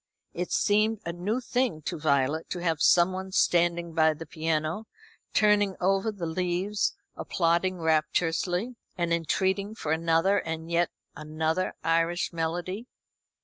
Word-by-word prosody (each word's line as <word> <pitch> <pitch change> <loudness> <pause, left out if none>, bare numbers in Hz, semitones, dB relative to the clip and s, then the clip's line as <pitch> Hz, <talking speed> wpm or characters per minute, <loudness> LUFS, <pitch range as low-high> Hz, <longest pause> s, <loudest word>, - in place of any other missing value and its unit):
It 180 +1 -4
seemed 215 +1 +2
a 170 - -3
new 200 +8 -2
thing 245 -10 -1
to 170 +1 -4
Violet 145 +1 +1
to - - -3
have 165 -4 -1
someone 185 +2 +3
standing 170 -2 +2
by 160 -1 +3
the 165 +2 -8
piano, 160 +5 -2 0.4
turning 205 -2 +3
over 195 +4 +1
the 195 -5 -5
leaves, 180 +4 -1 0.2
applauding 175 +2 0
rapturously, 165 +7 0 0.2
and 170 -1 0
entreating 190 +5 0
for 155 - -4
another 165 +5 +2
and 160 0 -5
yet 170 0 +2 0.3
another 155 +3 -2
Irish 165 +2 +1
melody. 175 +7 -3
175 Hz, 130 wpm, -27 LUFS, 160-190 Hz, 0.4 s, someone